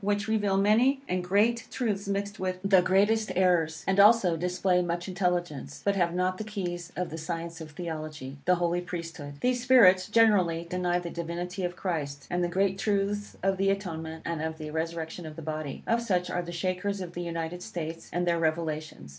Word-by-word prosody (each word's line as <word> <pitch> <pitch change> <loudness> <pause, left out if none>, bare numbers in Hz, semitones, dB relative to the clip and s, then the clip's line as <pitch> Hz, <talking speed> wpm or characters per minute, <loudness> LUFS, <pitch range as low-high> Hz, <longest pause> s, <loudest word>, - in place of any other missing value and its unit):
which 205 +1 0
reveal 205 -3 +1
many 230 +7 +4
and 180 0 -1
great 215 +5 +2
truths 205 -6 -2
mixed 200 +1 -2
with 185 -1 -1
the 195 -2 +5
greatest 205 +4 +2
errors, 175 -4 +2
and 195 +1 +1
also 200 -4 +6
display 180 +2 +1
much 175 0 -2
intelligence, 175 -5 -2
but 200 0 +2
have 175 -3 +2
not 185 +1 0
the - - -2
keys 180 -5 -4
of 180 -3 -3
the 160 - -5
science 165 0 -5
of 160 - -7
Theology 155 -4 -6
the 180 - +5
Holy 175 0 0
Priesthood. 165 -5 -7
These 250 0 +1
spirits, 195 -8 +6
generally, 195 -7 +4
deny 180 0 0
the 175 -1 -4
divinity 175 +3 -4
of 175 0 -2
Christ, 145 -7 -3
and 175 0 +1
the - - +2
great 190 +2 +1
truths 205 0 -1
of 195 0 +2
the 195 +1 +2
atonement, 160 -5 -3
and 165 -2 -2
of 160 0 -3
the 155 -1 -6
resurrection 160 +1 -4
of 155 - -9
the 165 - -8
body. 155 -2 -4
Of 230 +1 +2
such 185 -6 0
are 180 - 0
the 175 0 -7
Shakers 185 +3 -2
of 180 -2 -6
the 175 - -4
United 170 0 -4
States, 165 -2 -6
and 175 0 0
their 170 -1 +2
revelations. 155 - -2
180 Hz, 195 wpm, -28 LUFS, 165-195 Hz, -, also